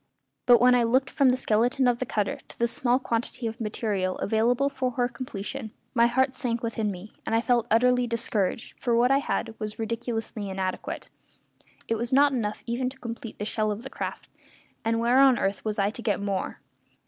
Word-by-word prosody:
But 245 -1 +8
when 250 +1 +6
I 245 - +4
looked 255 +3 +2
from 275 -3 +4
the 250 - +3
skeleton 245 +3 +2
of 240 -1 +2
the 255 - -2
cutter 210 -2 -1
to - - -13
the 235 - +2
small 245 +1 +2
quantity 240 -1 -3
of 225 +2 -4
material 210 -4 -1
available 235 +6 +2
for 265 -2 -1
her 245 0 +1
completion, 235 0 -6 0.2
my 235 -1 +5
heart 260 +2 +2
sank 240 -2 -2
within 225 -2 -1
me, 195 +2 -8
and 225 - -1
I 225 - +3
felt 240 -2 +2
utterly 250 +2 +3
discouraged, 225 -3 -1
for 240 -2 +1
what 245 +2 +4
I 275 - +5
had 235 -4 -2
was 215 -1 -4
ridiculously 225 -2 -3
inadequate. 190 -1 -4 0.8
It 225 -1 0
was 235 +1 -2
not 280 +2 +5
enough 215 -5 -2
even 245 +2 -1
to 265 - -13
complete 230 -3 -7
the 205 - -4
shell 215 0 0
of 210 +2 -3
the 265 - -8
craft; - - -5 0.6
and 230 0 +1
where 240 +3 +4
on 270 -3 +6
earth 195 0 -1
was 215 -1 -2
I 200 0 +2
to 235 - -8
get 210 -4 0
more? 200 -2 -3
235 Hz, 205 wpm, -26 LUFS, 215-250 Hz, 0.8 s, But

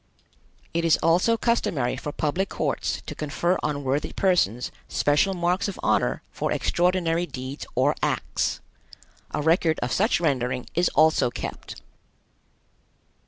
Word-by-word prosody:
It 170 0 0
is 165 -1 +4
also 180 +8 +3
customary 160 - 0
for 145 +3 -5
public 170 +7 -1
courts - - -2
to - - -5
confer 170 +4 -1
on 145 -1 -2
worthy 135 +2 -1
persons 150 - +1 0.2
special 150 +7 +2
marks 175 +3 0
of 200 - -6
honor - - +1
for - - -2
extraordinary 175 -1 +1
deeds 130 0 -7
or - - +3
acts. - - -1 0.7
A 150 - -3
record 160 0 +3
of 120 - -2
such 215 0 +2
rendering 130 -6 0
is 175 +2 +2
also 160 -5 +4
kept. - - -7
160 Hz, 130 wpm, -25 LUFS, 140-180 Hz, 0.7 s, is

